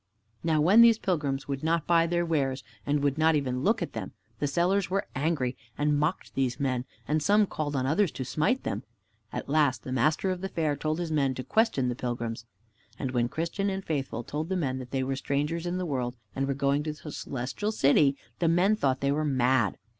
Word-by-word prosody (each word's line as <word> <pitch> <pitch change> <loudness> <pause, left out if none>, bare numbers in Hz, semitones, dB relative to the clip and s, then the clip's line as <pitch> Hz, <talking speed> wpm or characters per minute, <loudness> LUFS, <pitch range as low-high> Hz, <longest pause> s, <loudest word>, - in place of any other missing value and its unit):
Now 160 -2 +2
when 195 +9 +7
these 230 -2 +7
pilgrims 150 -9 -1
would 140 0 -3
not 165 0 +1
buy 170 -1 +4
their 175 0 +1
wares 140 -5 0 0.2
and 145 0 +1
would 145 +1 +1
not 160 0 +4
even 130 -3 -1
look 220 - +2
at - - -6
them, - - -5 0.3
the 145 - 0
sellers 175 +5 +1
were 195 +2 0
angry 135 -3 0 0.2
and 150 0 +2
mocked 150 +5 -1
these 130 -2 -1
men, 130 -3 0 0.2
and 155 +1 +1
some 205 +5 +4
called 150 -6 -3
on 130 -1 0
others 175 +7 +2
to 130 - -4
smite 250 - 0
them. - - -2 0.5
At - - -5
last 145 -4 +2
the 130 - -6
master 155 +9 +2
of 180 -1 -4
the 195 - -3
fair 155 -5 0
told 155 +2 -2
his 170 -2 -3
men 140 -4 +1
to 130 - -4
question 220 - +2
the 125 - 0
pilgrims. 120 -2 -4 0.5
And 130 -3 -3
when 120 -1 +1
Christian 170 +7 -2
and 190 0 -4
Faithful 135 -6 -2
told 155 +7 -4
the 190 - 0
men 130 -6 -1
that 125 -1 -8
they 130 0 -1
were 135 +1 -1
strangers 150 +5 -1
in 175 +1 -1
the 185 - -2
world 125 -5 -2 0.2
and 135 0 0
were 140 - 0
going 140 +1 +1
to 155 0 -3
the 150 0 -9
Celestial 135 - -3
City, 140 -6 +4 0.2
the 170 - +2
men 180 +6 +4
thought 135 -10 0
they 140 0 +2
were 150 +2 0
mad. 130 -6 +2
150 Hz, 220 wpm, -28 LUFS, 130-170 Hz, 0.5 s, when